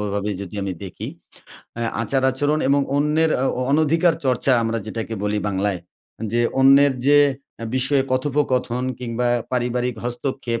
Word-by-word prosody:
ভাবেই 100 0 -2
যদি 100 +2 -10
আমি 95 -1 -3
দেখি। 95 - -7 0.7
অ্যা 115 -1 -1
আচার-আচরণ 135 +4 +1
এবং 140 +1 +4 0.2
অন্যের 150 +2 +2
আ 130 - 0
অ - - -1
অনধিকার 160 +3 +3
চর্চা 130 +1 +2
আমরা 115 0 -1
যেটাকে 115 0 -4
বলি 105 0 0
বাংলায়, 95 -1 -1 0.5
যে 120 - +2 0.2
অন্যের 135 +1 +6
যে 145 +1 +6 0.4
অ্যা 115 - -5
বিষয়ে 135 +1 +2
কথোপকথন 130 -2 0 0.2
কিংবা 120 0 -1 0.2
পারিবারিক 125 0 -1
হস্তক্ষেপ 120 -1 -3
125 Hz, 140 wpm, -21 LUFS, 115-140 Hz, 0.7 s, অন্যের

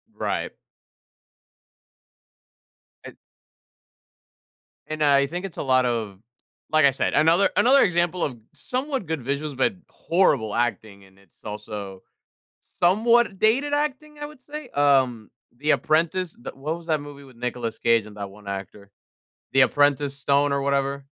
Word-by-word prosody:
Right. - - -3 2.5
And - - -10 1.7
and 155 0 -2
I 140 -1 +4
think 175 +5 -5
it's 190 - -9
a - - -3
lot 130 -2 +3
of 110 -5 -2 0.5
like 155 -2 +5
I 140 - +6
said, 135 - -1
another 165 +5 +4
another 270 +3 +6
example 175 -1 +1
of 125 -5 -3 0.2
somewhat 260 - -3
good 160 0 -3
visuals 140 +2 -3
but 200 - +2 0.2
horrible 145 - +1
acting 110 -4 -2
and 95 0 -21
it's 100 -4 -25
also 105 -2 -7 0.6
somewhat 215 +4 +2
dated 270 +7 +2
acting 300 +1 -2
I 295 - -4
would 300 -2 -14
say, 295 0 -9
um, 130 -6 +2 0.3
The 150 +4 -1
Apprentice 165 +3 0
the - - -7
what 150 +4 -4
was 170 -1 -13
that 155 -2 0
movie 145 -1 -11
with 130 -3 -17
Nicolas 120 -2 -4
Cage 115 -2 +2
and 105 -1 -13
that 100 -1 -6
one 105 +1 -16
actor? 100 +1 -7 0.6
The 135 - +5
Apprentice 145 +1 +2
Stone 140 +1 +2
or 140 - 0
whatever? 140 0 -1
140 Hz, 145 wpm, -24 LUFS, 120-175 Hz, 2.5 s, I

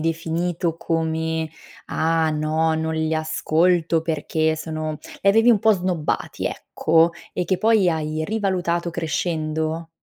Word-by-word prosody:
definito 165 +1 -1
come: 160 -1 -1 0.4
"Ah 160 0 +1
no, 155 +1 +1
non 160 0 -1
li 160 0 0
ascolto 160 +2 +1
perché 160 0 0
sono" 155 -1 -4 0.2
li 200 - +4
avevi 225 +4 +6
un 220 - +5
po' 220 -1 +5
snobbati, 180 -4 -2
ecco, 165 +1 +2 0.2
e 180 - -1
che 185 0 0
poi 220 -4 +4
hai 155 -1 -1
rivalutato 180 -5 -1
crescendo? 160 -1 -2
160 Hz, 125 wpm, -22 LUFS, 160-175 Hz, 0.4 s, avevi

